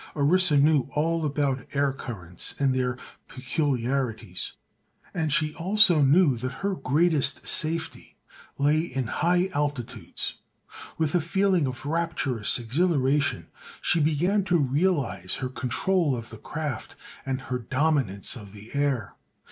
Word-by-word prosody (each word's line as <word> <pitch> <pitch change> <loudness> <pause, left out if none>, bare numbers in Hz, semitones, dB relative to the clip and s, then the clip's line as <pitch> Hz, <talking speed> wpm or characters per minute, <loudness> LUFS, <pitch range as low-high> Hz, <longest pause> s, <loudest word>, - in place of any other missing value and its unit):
Orissa 155 +2 +4
knew 145 -1 +4
all 165 +2 +1
about 140 -3 -1
air 140 -1 +1
currents 95 -10 -7
and 135 -2 +2
their 130 -1 -1 0.3
peculiarities 125 - -2 0.6
and 160 -3 -1
she 150 +1 +1
also 180 -2 +5
knew 140 -1 +4
that 130 +8 -6
her 200 - +1
greatest 150 -2 +1
safety 160 0 -1 0.4
lay 145 +2 +3
in 135 -6 -2
high 175 - +1
altitudes. 125 - -3 0.6
With 160 -2 0
a 175 - +3
feeling 185 -2 +1
of 130 +1 -6
rapturous 150 -8 0
exhilaration 140 +2 0 0.3
she 175 - +1
began 165 +7 +2
to 180 -2 +3
realize 135 - 0
her 130 - -4
control 145 +5 0
of 115 -1 -7
the 110 - -10
craft 150 -7 -5 0.3
and 130 -1 -2
her 125 -1 -4
dominance 130 -5 +1
of 105 -5 -11
the 105 +2 -11
air. 140 -7 -1
145 Hz, 130 wpm, -26 LUFS, 125-160 Hz, 0.6 s, also